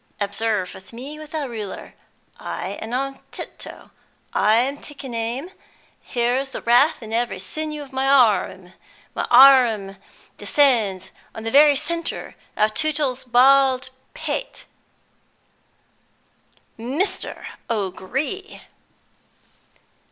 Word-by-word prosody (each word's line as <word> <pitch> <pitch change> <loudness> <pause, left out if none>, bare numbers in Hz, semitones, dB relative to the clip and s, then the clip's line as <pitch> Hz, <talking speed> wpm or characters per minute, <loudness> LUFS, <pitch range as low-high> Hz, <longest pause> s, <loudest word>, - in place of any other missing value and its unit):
Observe 200 -2 -2
me 270 +6 -8
with 310 -1 -10
the 305 -3 -3
ruler! 215 -5 -7 0.5
I - - -5
am 225 - -6
on 270 +2 -2
tiptoe; - - -8 0.4
I 215 +1 +3
am 265 +5 +1
taking 275 -4 -9
aim; 235 +9 -3 0.6
there 240 +1 +2
is 270 0 -6
wrath 245 +4 +4
in 220 0 -7
every 235 -2 0
sinew 300 +9 -4
of 275 -1 -15
my 265 +1 0
arrum! 210 -8 +3 0.4
My - - -3
arrum 240 -7 +6 0.4
descends 220 -10 +2 0.2
on 220 - -7
the 225 - -3
very 290 +2 +7
centre 335 +3 -2 0.2
of 215 0 +2
Tootle's 290 -4 0
bald 260 +1 +4 0.2
pate - - -4 1.0
" - - -39
"Mr. 305 - -3 0.2
O'Gree!" 230 - -3
255 Hz, 105 wpm, -22 LUFS, 225-285 Hz, 1.0 s, very